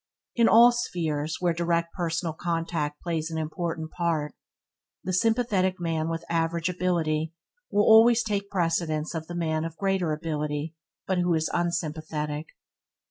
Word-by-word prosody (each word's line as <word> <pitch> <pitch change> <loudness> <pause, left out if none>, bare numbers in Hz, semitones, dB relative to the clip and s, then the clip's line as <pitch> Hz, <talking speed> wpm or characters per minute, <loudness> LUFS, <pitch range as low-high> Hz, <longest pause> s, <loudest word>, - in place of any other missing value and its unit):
In 235 -1 +4
all 235 +2 +8
spheres 160 -10 -2
where 175 -2 +1
direct 170 0 0
personal 165 -2 -2
contact 165 -3 -2
plays 165 -2 -2
an 160 - -4
important 160 0 -3
part, 165 -4 -1 0.7
the 185 - -2
sympathetic 195 -3 +1
man 165 -2 -1
with 165 0 -4
average 165 +1 0
ability 165 -3 -1 0.3
will 205 - +3
always 230 +2 +7
take 200 -2 -2
precedence 165 -3 0
of 160 -1 -5
the 175 - -6
man 160 -2 -1
of 165 0 -6
greater 195 -4 0
ability 150 0 -3 0.3
but 190 -1 0
who 175 -1 +2
is 160 0 -1
unsympathetic. 155 -3 -2
170 Hz, 140 wpm, -26 LUFS, 160-180 Hz, 0.7 s, all